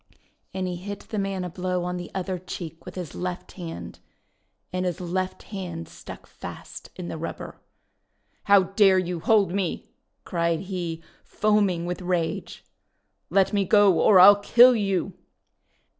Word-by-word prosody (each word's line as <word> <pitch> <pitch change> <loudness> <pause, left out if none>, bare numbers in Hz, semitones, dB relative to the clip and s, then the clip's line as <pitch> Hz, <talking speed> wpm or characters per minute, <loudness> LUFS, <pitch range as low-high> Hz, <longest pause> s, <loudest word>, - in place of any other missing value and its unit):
And 190 -1 -3
he 180 -1 -4
hit 200 +3 -7
the 215 - -5
man 195 -2 -2
a 180 - -4
blow 180 0 -2
on 180 0 -3
the 175 -1 -7
other 185 -1 -3
cheek 170 -2 -8
with 180 - -9
his 180 -5 -6
left 180 0 -5
hand. 170 -3 -8 0.7
And 185 0 -1
his 180 0 -2
left 185 +1 -3
hand 175 -4 -5
stuck - - -11
fast - - -10
in 180 -2 -7
the 160 - -6
rubber. 165 - -7 0.8
:*How 200 -1 +6
dare 195 +1 +4
you 180 -2 -1
hold 200 +2 +3
me!' 190 -3 -3 0.3
cried 170 -1 -1
he, 175 -4 -5 0.2
foaming 205 -5 +1
with 180 +1 -4
rage. 175 -2 -2 0.4
:' - - -50
Let 195 +4 +2
me 200 -1 +2
go 195 -3 +4
or 200 -4 +6
I 185 +2 +11
'11 205 0 +4
kill 245 +3 +7
you 195 -3 -1
185 Hz, 160 wpm, -25 LUFS, 175-195 Hz, 0.8 s, I